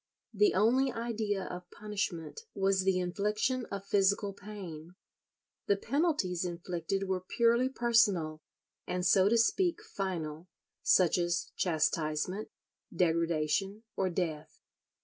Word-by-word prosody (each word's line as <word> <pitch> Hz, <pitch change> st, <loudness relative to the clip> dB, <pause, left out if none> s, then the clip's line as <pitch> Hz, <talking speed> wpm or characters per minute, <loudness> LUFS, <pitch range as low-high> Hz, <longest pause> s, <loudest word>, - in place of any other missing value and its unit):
The 415 Hz, -3 st, +3 dB
only 255 Hz, +5 st, +3 dB
idea 220 Hz, -4 st, -2 dB
of 180 Hz, 0 st, -7 dB
punishment 205 Hz, -, -4 dB
was 195 Hz, 0 st, +2 dB
the 190 Hz, -1 st, +3 dB
infliction 210 Hz, +7 st, -1 dB
of 200 Hz, 0 st, -6 dB
physical 200 Hz, 0 st, +2 dB
pain. 185 Hz, -5 st, -9 dB, 0.7 s
The 200 Hz, -, +3 dB
penalties 255 Hz, -, 0 dB
inflicted 175 Hz, +2 st, -3 dB
were 185 Hz, -1 st, -1 dB
purely 235 Hz, +6 st, +2 dB
personal, 205 Hz, -11 st, +2 dB, 0.5 s
and 180 Hz, 0 st, -2 dB
so 190 Hz, +1 st, +5 dB
to 235 Hz, -, +3 dB
speak 340 Hz, -, +2 dB
final; 170 Hz, -4 st, -4 dB, 0.3 s
such 180 Hz, -1 st, +4 dB
as 175 Hz, 0 st, -1 dB
chastisement, 160 Hz, +3 st, 0 dB, 0.4 s
degradation, 170 Hz, +3 st, 0 dB
or 190 Hz, -1 st, 0 dB
death. 165 Hz, -4 st, -3 dB
195 Hz, 110 wpm, -31 LUFS, 175-215 Hz, 0.7 s, so